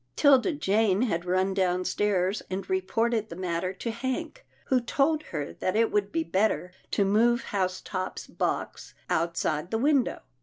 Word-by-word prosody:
'Tilda 285 +4 +5
Jane 215 - +2
had 170 -8 -1
run 185 +2 +1
downstairs 185 +1 +1
and 190 +1 -4
reported 235 - 0
the 170 - -7
matter 180 0 -2
to 230 +4 -4
Hank, 260 - -4 0.2
who 255 -2 +2
told 285 +6 +1
her 150 -3 -5
that 185 - -2
it 225 +1 +3
would 205 -1 0
be 330 0 0
better 195 - 0 0.2
to 200 - +1
move 235 +4 +3
Housetop's 185 -1 -3
box - - -3 0.2
outside 165 -1 0
the 225 - 0
win 275 +1 +3
dow. - - -6
205 Hz, 155 wpm, -27 LUFS, 185-240 Hz, 0.2 s, Tilda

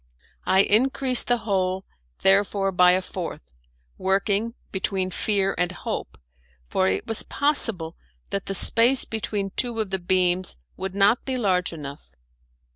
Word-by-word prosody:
I 190 - +5
increased 255 +4 +5
the 245 - +2
hole, 190 -2 -1 0.4
therefore, 195 0 +2
by 180 -1 +4
a 185 +1 0
fourth, 170 - -8 0.5
working 200 +4 0 0.2
between 190 -1 -2
fear 195 +1 -1
and 180 0 0
hope, 180 - -6 0.5
for 95 - +1
it 95 0 -1
was 225 - +1
possible 225 - 0 0.4
that 195 - -3
the 195 - -3
space 235 +7 +4
between 205 -3 -4
two 235 +2 -2
of 210 -3 -3
the 190 - -2
beams 180 0 0 0.2
would 190 0 -6
not 200 +4 +3
be 260 -1 -3
large 185 -6 0
enough. 140 - -10
195 Hz, 140 wpm, -23 LUFS, 185-220 Hz, 0.5 s, I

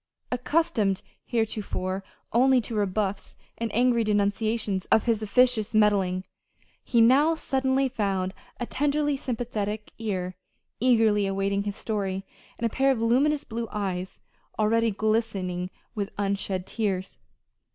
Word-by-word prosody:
Accustomed 250 - +1 0.2
heretofore 205 -4 -2 0.3
only 260 +2 +5
to 230 - -7
rebuffs 205 -1 -1 0.2
and 230 -1 -2
angry 240 0 +3
denunciations 205 -1 0
of 220 - +3
his 225 -2 +1
"officious 225 0 +2
meddling," 195 -4 +3 0.6
he 235 -2 +3
now 280 +8 +5
suddenly 265 -2 +1
found 195 -6 -1 0.3
a 240 - -1
tenderly 290 +2 +1
sympathetic 220 -5 -3
ear 185 -5 -2 0.5
eagerly 220 -4 +4
awaiting 195 +1 0
his 205 -1 -3
story, 195 -3 -3 0.3
and 235 - -2
a - - +2
pair 270 +1 +3
of 265 -4 +2
luminous 275 +6 +2
blue 230 -2 -4
eyes 190 -3 -3 0.4
already 230 +2 +3
glistening 200 -4 -1 0.2
with 200 -2 -3
unshed 195 -2 -1
tears. 195 -4 -2
215 Hz, 120 wpm, -26 LUFS, 200-245 Hz, 0.6 s, only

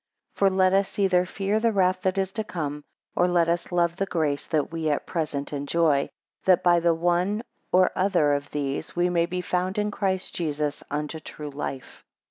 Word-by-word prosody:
6 - - -20
For 195 - +5
let 185 0 +3
us 195 0 +1
either 180 -3 +3
fear 200 +3 -1
the 230 +1 +2
wrath 185 -2 +2
that 190 +1 0
is 190 -1 0
to 220 +2 -2
come, 150 -7 -4 0.3
or 180 - +3
let 175 -2 +3
us 170 +1 -1
love 170 -1 +2
the 195 - -1
grace 155 -6 -1
that 155 -2 0
we 165 -1 -1
at 145 - -1
present 150 -4 -3
enjoy; 145 0 +1 0.4
that 185 -1 +4
by 175 -1 +5
the 170 0 +2
one 175 +6 +1 0.3
or 185 0 +4
other 180 -6 +2
of 145 0 -2
these, 145 +1 -3
we 175 0 +2
may 170 -1 +2
be 180 0 -3
found 180 +2 -1
in 210 0 0
Christ 190 -2 -1
Jesus, 150 -3 -2
unto 150 +2 -3
true 150 -1 -8
life. 140 -2 -6
175 Hz, 200 wpm, -25 LUFS, 150-185 Hz, 0.4 s, For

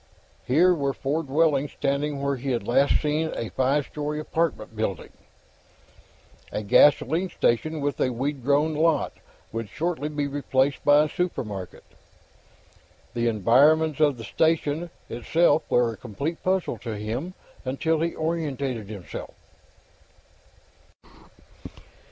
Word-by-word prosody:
Here 170 +8 +5
were 140 -4 -1
four 145 +5 -1
dwellings 145 -1 +1
standing 140 0 -1
where 140 0 +1
he 135 +2 -5
had 120 - -3
last 135 +4 +3
seen 155 +1 0
a 115 - -4
five 130 +7 +1
story 150 0 -4
apartment 155 -8 -2
building. 105 -5 -3 1.4
A 105 - -3
gasoline 150 - +4
station 155 +5 0
and 145 -2 -2
a 130 - +3
weed 135 +2 -3
grown 145 +4 +2
lot 155 -1 +1 0.4
would 115 -1 -4
shortly 160 - -2
be 145 -1 -2
replaced 140 -1 0
by 145 +1 +6
a - - 0
supermarket. 105 - -4 1.3
The 120 -1 0
environs 140 - +4
of 145 -4 +3
the 115 - -8
station 160 +3 0 0.2
itself 150 +6 +1
were 120 -2 +2
a - - -11
complete 140 - -5
puzzle 185 0 0
to 115 -3 -5
him, 120 - -4 0.3
until 155 +5 0
he 170 +1 -1
oriented 140 -9 -2
himself. 100 -5 -8
145 Hz, 125 wpm, -25 LUFS, 125-155 Hz, 1.4 s, by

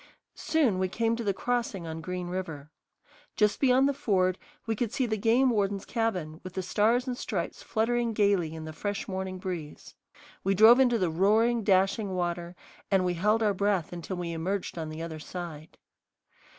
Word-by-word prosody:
Soon 270 - +1
we 185 - +1
came 230 +3 0
to 235 - -4
the 205 - +1
crossing 225 -3 -2
on 160 0 -5
Green 180 +1 -4
River. 160 -5 -5 0.6
Just 210 -1 +2
beyond 265 0 +4
the 280 - +1
ford 185 -8 +1 0.3
we 225 -1 -1
could 225 0 -2
see 260 - 0
the 220 -2 -1
game 235 +5 +3
warden's 200 -3 0
cabin, 185 -9 -2
with 185 - -8
the 190 - -3
stars 225 +6 +2
and 255 -2 -3
stripes 190 -8 -4
fluttering 235 +1 0
gayly 200 -6 +1
in 160 -1 -7
the 155 - -7
fresh 205 +5 -4
morning 190 -1 -4
breeze. 180 -5 -6 0.5
We 195 +1 +2
drove 225 +5 +8
into 245 -3 +4
the 180 -6 0
roaring, 220 +7 +3
dashing 195 0 +2
water, 175 0 -3 0.3
and 190 -2 +3
we 180 - +1
held 210 +6 +2
our 210 -2 +3
breath 195 -4 0
until 175 +2 -5
we 175 -1 -3
emerged 180 +4 -3
on 160 -2 -4
the 155 +1 -6
other 160 -2 -6
side. 160 -2 -8
195 Hz, 185 wpm, -28 LUFS, 175-225 Hz, 0.6 s, drove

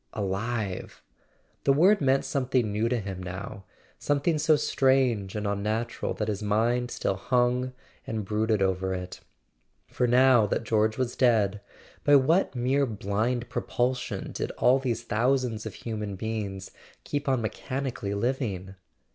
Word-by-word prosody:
Alive! 100 0 -3 0.6
The 140 - +4
word 185 +8 +5
meant 135 0 +2
something 130 -5 0
new 110 +3 0
to 125 - +1
him 95 -3 -6
now—something 100 - -3
so 155 +1 +4
strange 130 -9 +1
and 105 0 -3
unnatural 105 +3 -2
that 105 - -2
his 105 -1 -2
mind 115 +4 +1
still 95 - -2
hung 125 +4 +1 0.3
and 110 -2 -3
brooded 110 0 +1
over 95 0 0
it. 90 0 -6 0.7
For 125 - -1
now 125 -2 +5
that 110 - -1
George 110 -1 +1
was 130 -2 -1
dead, 105 -5 +2 0.4
by 145 - +6
what 145 +4 +3
mere 130 +3 +1
blind 110 +3 -1
propulsion 125 +1 -2
did - - -3
all 130 +2 +4
these 120 -3 -2
thousands 115 -1 0
of 105 - -8
human 105 -3 -5
beings 100 -2 -4 0.3
keep 145 -1 -2
on 130 -3 +1
mechani¬ 130 +4 -3
cally 100 -3 -4
living 100 -5 -2
115 Hz, 140 wpm, -27 LUFS, 105-130 Hz, 0.7 s, by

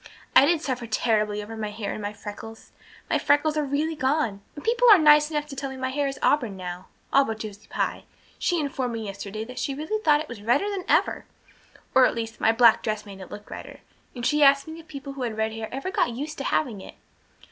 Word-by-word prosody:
I 275 - +8
did 330 -1 +2
suffer 245 -3 -3
terribly 215 -2 0
over 225 +2 -8
my 215 -1 -3
hair 210 -1 -4
and - - -6
my 205 0 -3
freckles. 210 +1 -10 0.4
My - - +1
freckles 300 +1 +2
are 305 - +1
really 295 +3 -1
gone; 265 -8 0
and 290 - -9
people 485 +1 +4
are 415 - +10
nice 300 -2 +6
enough 295 -2 -2
to 290 -2 -9
tell 275 0 -4
me 265 - -8
my 260 0 -2
hair 285 +1 0
is 270 -1 -4
auburn 240 -9 +2
now 180 0 -7 0.3
all 275 - +6
but 225 -4 -4
Josie 215 -1 -8
Pye. - - -2 0.3
She 350 -2 +1
informed 265 -4 -2
me 225 -1 -4
yesterday 200 +2 -6
that 250 +3 -8
she 275 - -2
really 315 +10 -3
thought 300 -6 +4
it 310 - -7
was 235 -4 -9
redder 245 - +1
than 380 -2 -4
ever, - - +2 0.7
or 260 -1 +7
at - - -3
least 225 0 -5
my 225 - +5
black 230 0 +5
dress 215 -1 -3
made 195 -2 -10
it 185 - -10
look 210 - -10
redder, - - -9 0.3
and 240 -1 -4
she 300 +2 +2
asked 280 +1 +5
me 320 +1 -8
if 325 - -14
people 275 -2 -8
who 275 - -8
had 230 -3 -3
red 220 0 0
hair 225 -1 -5
ever 275 +8 -4
got - - +2
used 285 +6 -5
to 275 - -4
having 230 -10 0
it. - - -11
260 Hz, 245 wpm, -25 LUFS, 220-295 Hz, 0.7 s, are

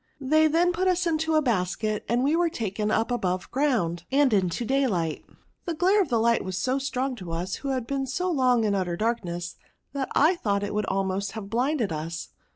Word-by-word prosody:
They 310 +3 +4
then 335 +3 +3
put 370 +2 0
us 360 -1 +2
into 320 -1 0
the 310 -1 +3
basket, 215 -2 -1
and 240 +2 +2
we 290 +4 +2
were 345 0 +2
taken 215 -5 -2
up 225 +3 +1
above 185 -6 -2
ground, 225 - 0
and 275 -2 +3
into 190 +3 +1
daylight. 215 - 0 0.4
The 340 -3 -2
glare 380 +6 +3
of 380 - 0
Hght 235 -2 +2
was 185 -1 -4
so 255 +7 0
strong 265 -1 -2
to 180 -5 -7
us, 175 +3 -3
who 280 - -7
had 260 -3 -1
been 270 +1 -2
so 360 +8 -1
long 255 -6 +3
in 210 -2 +1
utter 180 -3 -1
darkness, 175 -6 -2 0.4
that 275 -2 -2
I 330 +5 +4
thought 200 -7 0
it 205 - -3
would 210 -1 -1
almost 195 0 -1
have 210 -3 -7
blinded 245 - 0
us. 160 +2 -5
235 Hz, 205 wpm, -26 LUFS, 195-285 Hz, 0.4 s, They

